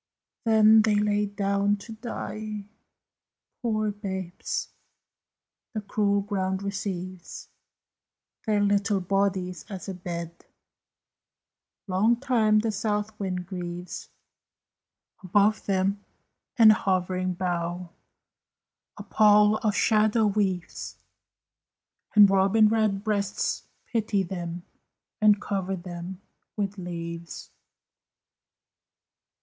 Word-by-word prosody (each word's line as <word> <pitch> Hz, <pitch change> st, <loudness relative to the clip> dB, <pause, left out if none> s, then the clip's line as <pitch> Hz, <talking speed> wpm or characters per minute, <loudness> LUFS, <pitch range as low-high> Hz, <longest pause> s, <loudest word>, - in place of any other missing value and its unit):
Then 220 Hz, -1 st, +6 dB
they 215 Hz, -1 st, +2 dB
lie 210 Hz, 0 st, +2 dB
down 200 Hz, 0 st, 0 dB
to 205 Hz, +3 st, -11 dB
die, 215 Hz, -2 st, -6 dB, 1.0 s
poor 215 Hz, -3 st, 0 dB
babes! 190 Hz, -3 st, -4 dB, 1.1 s
The 215 Hz, -, -1 dB
cruel 200 Hz, 0 st, +1 dB
ground 190 Hz, -1 st, -2 dB
receives 185 Hz, -2 st, -5 dB, 1.0 s
Their 210 Hz, -1 st, +2 dB
little 200 Hz, 0 st, +2 dB
bodies 185 Hz, -1 st, -1 dB
as 195 Hz, -2 st, -7 dB
a 195 Hz, -, -3 dB
bed; 170 Hz, -2 st, -6 dB, 1.4 s
Long 205 Hz, +4 st, +2 dB
time 230 Hz, -4 st, +2 dB
the 220 Hz, +1 st, +1 dB
south 210 Hz, +1 st, -1 dB
wind 185 Hz, -2 st, -3 dB
grieves 175 Hz, -1 st, -6 dB, 1.1 s
Above 205 Hz, +3 st, +2 dB
them; 195 Hz, +1 st, 0 dB, 0.5 s
and 225 Hz, -2 st, +9 dB
a -, -, +7 dB
hovering 185 Hz, -2 st, -1 dB
bough 175 Hz, -1 st, -3 dB, 1.1 s
A -, -, -7 dB
pall 210 Hz, 0 st, +5 dB
of 210 Hz, -2 st, 0 dB
shadow 215 Hz, +3 st, +3 dB
weaves; 195 Hz, -4 st, -2 dB, 1.2 s
And 205 Hz, -1 st, +9 dB
robin 195 Hz, +3 st, +4 dB
red 215 Hz, -3 st, +1 dB
breasts 205 Hz, -3 st, -1 dB, 0.2 s
pity 215 Hz, -4 st, 0 dB
them, 175 Hz, -1 st, -5 dB, 0.6 s
And 210 Hz, -1 st, +5 dB
cover 195 Hz, -2 st, -2 dB
them 180 Hz, +1 st, -8 dB, 0.3 s
with 200 Hz, -1 st, -2 dB
leaves! 170 Hz, -2 st, -7 dB
200 Hz, 95 wpm, -26 LUFS, 185-215 Hz, 1.4 s, and